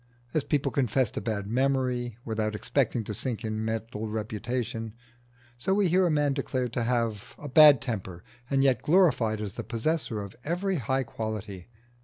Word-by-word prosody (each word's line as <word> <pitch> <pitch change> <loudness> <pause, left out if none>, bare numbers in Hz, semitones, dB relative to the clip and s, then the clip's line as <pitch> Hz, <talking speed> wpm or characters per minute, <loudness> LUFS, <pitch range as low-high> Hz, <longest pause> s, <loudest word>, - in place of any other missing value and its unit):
As 155 - +1
people 145 -2 0
confess 130 -3 +1
to - - -4
bad 105 -1 -2
memory 125 0 0
without 110 -1 -1
expecting 120 +1 0
to 105 - -5
sink 115 +1 -4
in 110 0 -2
mental 110 0 -3
reputation, 110 +1 -3 0.6
so 190 +10 +1
we 200 -3 +3
hear 185 +2 +4
a - - +1
man 145 -2 +2
declared 130 -3 -2
to 120 -3 -1
have 115 -4 -1
a 145 - -8
bad 145 -2 +8
temper 95 -8 -5 0.3
and 135 0 +2
yet 135 -2 +3
glorified 145 - +3
as 105 -3 -4
the - - -5
possessor 115 +1 -1
of 100 -1 -7
every 180 +5 -1
high 130 +1 0
quality. 110 -5 -5
120 Hz, 170 wpm, -28 LUFS, 110-140 Hz, 0.6 s, bad